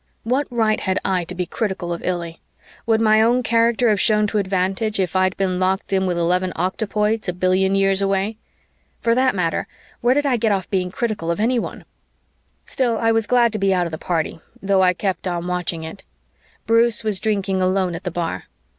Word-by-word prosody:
What 260 Hz, +5 st, 0 dB
right 225 Hz, -3 st, +1 dB
had 190 Hz, -1 st, -1 dB
I 180 Hz, -2 st, 0 dB
to 180 Hz, -, -7 dB
be 180 Hz, 0 st, -2 dB
critical 190 Hz, -3 st, -3 dB
of 170 Hz, -, -7 dB
Illy? 170 Hz, -2 st, -3 dB, 0.5 s
Would 225 Hz, -1 st, +3 dB
my 215 Hz, -1 st, +5 dB
own 240 Hz, +3 st, +3 dB
character 230 Hz, +1 st, +2 dB
have 210 Hz, -3 st, +2 dB
shown 210 Hz, -1 st, +3 dB
to 210 Hz, 0 st, 0 dB
advantage 195 Hz, +2 st, -1 dB
if 185 Hz, -2 st, -1 dB
I'd 185 Hz, 0 st, +2 dB
been 185 Hz, -2 st, 0 dB
locked 190 Hz, +1 st, 0 dB
in 190 Hz, 0 st, +2 dB
with 175 Hz, -1 st, -1 dB
eleven 180 Hz, +2 st, +1 dB
octopoids 210 Hz, +4 st, -1 dB
a -, -, -1 dB
billion 185 Hz, +2 st, +1 dB
years 195 Hz, 0 st, +2 dB
away? 195 Hz, +2 st, 0 dB, 0.6 s
For 230 Hz, -, +2 dB
that 255 Hz, -1 st, +2 dB
matter, 170 Hz, -3 st, -1 dB, 0.3 s
where 245 Hz, +2 st, +2 dB
did 290 Hz, 0 st, +1 dB
I 260 Hz, -3 st, +2 dB
get 220 Hz, -1 st, +1 dB
off 190 Hz, -3 st, -1 dB
being 185 Hz, -2 st, 0 dB
critical 210 Hz, -4 st, -3 dB
of 170 Hz, -, -1 dB
anyone? 235 Hz, +2 st, -1 dB, 0.8 s
Still, 240 Hz, -4 st, 0 dB
I 225 Hz, +1 st, +2 dB
was 225 Hz, -1 st, +1 dB
glad 240 Hz, -2 st, +3 dB
to 215 Hz, -, -2 dB
be 195 Hz, -1 st, +2 dB
out 180 Hz, -1 st, +1 dB
of 170 Hz, -, -5 dB
the 160 Hz, -, -6 dB
party, 165 Hz, -2 st, -2 dB, 0.2 s
though 195 Hz, -1 st, +2 dB
I 180 Hz, -1 st, +4 dB
kept 190 Hz, 0 st, -2 dB
on 175 Hz, -1 st, -2 dB
watching 180 Hz, -2 st, -2 dB
it. 160 Hz, -, -8 dB, 0.6 s
Bruce 230 Hz, 0 st, +2 dB
was 210 Hz, -3 st, 0 dB
drinking 195 Hz, -3 st, 0 dB
alone 185 Hz, -1 st, +1 dB
at 165 Hz, -, -6 dB
the 180 Hz, -, -2 dB
bar. 170 Hz, -1 st, -4 dB
195 Hz, 205 wpm, -21 LUFS, 180-220 Hz, 0.8 s, my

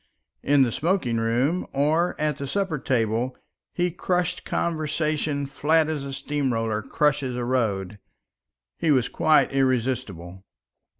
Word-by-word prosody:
In 140 Hz, -1 st, +4 dB
the 120 Hz, -, 0 dB
smoking 155 Hz, -, 0 dB
room 125 Hz, +10 st, 0 dB
or 155 Hz, +5 st, +1 dB
at 150 Hz, -2 st, 0 dB
the 140 Hz, -, -5 dB
supper 185 Hz, -1 st, -1 dB
table 120 Hz, 0 st, 0 dB, 0.3 s
he 175 Hz, 0 st, 0 dB
crushed 180 Hz, +1 st, -1 dB
conversation 155 Hz, -3 st, -1 dB
flat 155 Hz, +3 st, +2 dB
as 150 Hz, -3 st, -2 dB
a 140 Hz, -, -6 dB
steam 140 Hz, 0 st, -2 dB
roller 115 Hz, -2 st, -1 dB
crushes 140 Hz, -1 st, 0 dB
a 125 Hz, -1 st, -2 dB
road. 105 Hz, -6 st, -1 dB, 0.8 s
He 165 Hz, -, 0 dB
was 130 Hz, -5 st, +3 dB
quite 155 Hz, -1 st, +3 dB
irresistible. 125 Hz, -9 st, -1 dB
140 Hz, 130 wpm, -24 LUFS, 120-155 Hz, 0.8 s, In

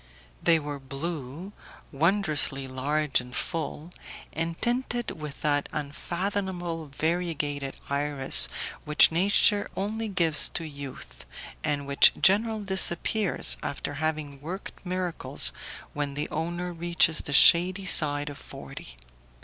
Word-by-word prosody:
They 165 Hz, -, +4 dB
were 145 Hz, -2 st, -6 dB
blue, 140 Hz, +5 st, -7 dB, 0.4 s
wondrously 155 Hz, -4 st, +2 dB
large 140 Hz, +2 st, 0 dB
and 125 Hz, 0 st, -11 dB
full, 165 Hz, +1 st, -5 dB, 0.4 s
and 165 Hz, +1 st, -3 dB
tinted 240 Hz, 0 st, -1 dB
with 150 Hz, -3 st, -9 dB
that 145 Hz, -1 st, 0 dB
unfathomable 175 Hz, +2 st, -4 dB
variegated 145 Hz, -2 st, -3 dB
iris 140 Hz, -1 st, +4 dB, 0.3 s
which 150 Hz, +1 st, +4 dB
nature 200 Hz, +4 st, +2 dB
only 220 Hz, +3 st, -3 dB
gives 170 Hz, -6 st, +3 dB
to 170 Hz, -, -1 dB
youth, 140 Hz, -, -10 dB, 0.4 s
and 145 Hz, -2 st, -2 dB
which 140 Hz, 0 st, +6 dB
generally 215 Hz, +2 st, +3 dB
disappears, 190 Hz, -, 0 dB
after -, -, -5 dB
having 150 Hz, -2 st, -4 dB
worked 180 Hz, +6 st, -8 dB
miracles, 180 Hz, -, -1 dB, 0.4 s
when 145 Hz, -1 st, -3 dB
the 145 Hz, -, -3 dB
owner 175 Hz, +3 st, -4 dB
reaches 170 Hz, -1 st, +2 dB
the 145 Hz, -, -5 dB
shady 180 Hz, +6 st, +6 dB
side 145 Hz, -4 st, +4 dB
of 140 Hz, -, -11 dB
forty. -, -, -11 dB
160 Hz, 115 wpm, -26 LUFS, 145-180 Hz, 0.4 s, which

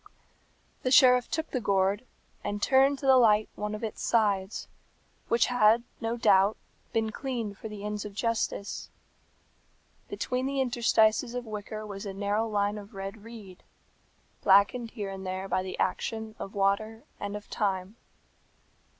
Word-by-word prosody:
The 255 Hz, -, 0 dB
sheriff 250 Hz, -1 st, +6 dB
took 320 Hz, 0 st, -3 dB
the 255 Hz, -, -1 dB
gourd, 200 Hz, +2 st, +1 dB, 0.4 s
and 205 Hz, -, -3 dB
turned 270 Hz, +5 st, +4 dB
to 275 Hz, -, -7 dB
the 265 Hz, -1 st, +7 dB
light 215 Hz, -3 st, +4 dB
one 210 Hz, 0 st, -4 dB
of 215 Hz, -, -8 dB
its 220 Hz, -, -4 dB
sides, 205 Hz, -3 st, +1 dB, 0.6 s
which 235 Hz, 0 st, +3 dB
had, 235 Hz, -2 st, +4 dB, 0.2 s
no 230 Hz, +1 st, -2 dB
doubt, 200 Hz, -2 st, +4 dB, 0.3 s
been 220 Hz, -1 st, 0 dB
cleaned 230 Hz, -6 st, -4 dB
for 220 Hz, -, -6 dB
the 210 Hz, -1 st, -8 dB
ends 210 Hz, 0 st, -3 dB
of 205 Hz, -1 st, -8 dB
justice. 225 Hz, -2 st, -2 dB, 1.2 s
Between 255 Hz, +1 st, -2 dB
the 275 Hz, 0 st, -2 dB
interstices 235 Hz, -1 st, +2 dB
of 245 Hz, 0 st, -4 dB
wicker 215 Hz, 0 st, -6 dB
was 200 Hz, 0 st, -7 dB
a 195 Hz, -, -6 dB
narrow 205 Hz, +3 st, 0 dB
line 205 Hz, 0 st, 0 dB
of 200 Hz, 0 st, -13 dB
red 195 Hz, +2 st, -7 dB
reed, 215 Hz, -5 st, -11 dB, 0.8 s
blackened 200 Hz, +5 st, +4 dB
here 205 Hz, -4 st, -5 dB
and 190 Hz, 0 st, -7 dB
there 185 Hz, +1 st, -4 dB
by 185 Hz, 0 st, 0 dB
the 185 Hz, 0 st, -6 dB
action 220 Hz, -1 st, -2 dB
of 195 Hz, -, -7 dB
water 205 Hz, +3 st, 0 dB, 0.2 s
and 205 Hz, 0 st, -4 dB
of 210 Hz, 0 st, -8 dB
time. 195 Hz, 0 st, -1 dB
215 Hz, 155 wpm, -28 LUFS, 200-235 Hz, 1.2 s, the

